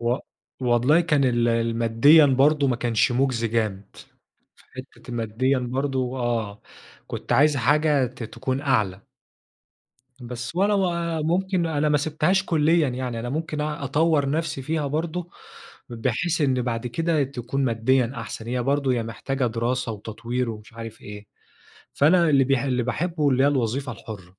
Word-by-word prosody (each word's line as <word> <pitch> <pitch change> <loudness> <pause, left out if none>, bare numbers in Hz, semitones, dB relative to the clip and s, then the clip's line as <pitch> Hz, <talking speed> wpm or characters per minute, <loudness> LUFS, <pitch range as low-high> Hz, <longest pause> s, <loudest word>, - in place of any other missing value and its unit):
و 120 +1 +1 0.5
والله 125 +6 +3
كان 150 -5 +2
ال 120 -2 +2
الماديًا 115 +6 +4
برضو 140 +2 +3
ما 125 -3 +1
كانش 120 +3 +1
مجزي 120 -3 0
جامد، 105 -3 -3 0.6
في - - -23
حتة - - -13
الماديًا 120 +3 0
برضو 130 0 -2
آه، 115 -4 -2 0.4
كُنت - - -5
عايز 150 0 +4
حاجة 145 +1 +2
ت 120 - -10
تكون 130 +4 -3
أعلى. 105 -9 0 1.1
بس 120 +5 -7
ولا 200 +2 +3
و 195 -2 +2 0.3
ممكن 180 +2 0
أنا 155 -2 0
ما 150 - +3
سيبتهاش 155 +6 +1
كليًا 160 -2 +2
يعني، 125 -2 -4
أنا 120 - -5
ممكن 155 +1 -3
أ 150 -1 -3
أطور 145 0 +1
نفسي 155 -3 -2
فيها 155 +1 -2
برضو، 165 +4 -3 0.6
بحيث 155 +8 -1
إن 130 -4 +1
بعد 115 -1 -3
كده 160 +5 0
تكون 135 +1 -3
ماديًا 120 +1 +1
أحسن، 115 -2 -7
هي 125 0 -1
برضو 140 +1 0
هي 120 -2 +1
محتاجة 125 +4 -3
دراسة 120 +1 -2
وتطوير 115 +3 -4
ومش 105 0 -10
عارف 115 -1 -9
إيه، 105 0 -10 0.7
فأنا 170 +4 +4
اللِّي 135 -2 +4
ب 135 - -5
اللي 130 -1 +1
باحبه 155 +4 -1
اللي 130 0 +2
هي 145 - +5
الوظيفة 130 0 -1
الحُرَّة. 110 -4 -9
130 Hz, 155 wpm, -24 LUFS, 115-150 Hz, 1.1 s, هي